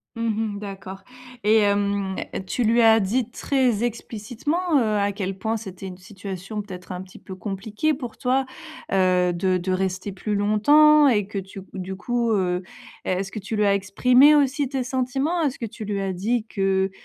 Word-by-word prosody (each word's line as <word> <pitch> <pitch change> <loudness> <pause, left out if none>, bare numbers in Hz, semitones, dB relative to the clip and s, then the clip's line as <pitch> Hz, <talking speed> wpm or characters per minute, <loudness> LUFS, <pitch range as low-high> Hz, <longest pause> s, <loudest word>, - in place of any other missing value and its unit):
Mmh 230 0 -1 0.3
mh - - -7
d'accord, 195 -1 -8 0.4
et 215 +1 +4
hem, 200 -1 +1 0.3
tu 245 - -1
lui 230 +2 +4
as 225 0 +7
dit 230 +4 -1
très 255 -6 +1
explicitement, 240 - -3 0.2
heu, - - +2 0.2
à 200 0 +1
quel 195 -1 -4
point 220 +3 -1
c'était 195 -3 -8
une 180 - -8
situation 195 +1 -7
peut-être 185 -3 -9
un 180 0 -4
petit 185 -1 -13
peu 190 - -10
compliquée 210 +9 -2
pour 245 -5 -7
toi, 265 +1 +1 0.5
heu, 180 -2 +3
de 185 +1 +1
de 185 +1 -3
rester 190 +1 -1
plus 205 +3 -3
longtemps? 290 +9 +5
Et 210 -6 +3
que 200 0 -4
tu 195 0 -9
du 190 0 -5
coup, 235 +3 -1
heu, 180 -3 +1 0.4
est-ce 190 +1 -1
que 215 - -5
tu 210 +3 -5
lui 210 0 +2
as 200 - +4
exprimé 250 +9 +5
aussi 280 -1 +2
tes 265 -2 -2
sentiments? 270 +7 -1
Est-ce 285 -4 0
que 230 - -4
tu 215 0 -8
lui 205 -1 -2
as 195 -1 -2
dit 220 +5 -1
que, 195 -2 0
205 Hz, 185 wpm, -23 LUFS, 190-240 Hz, 0.5 s, as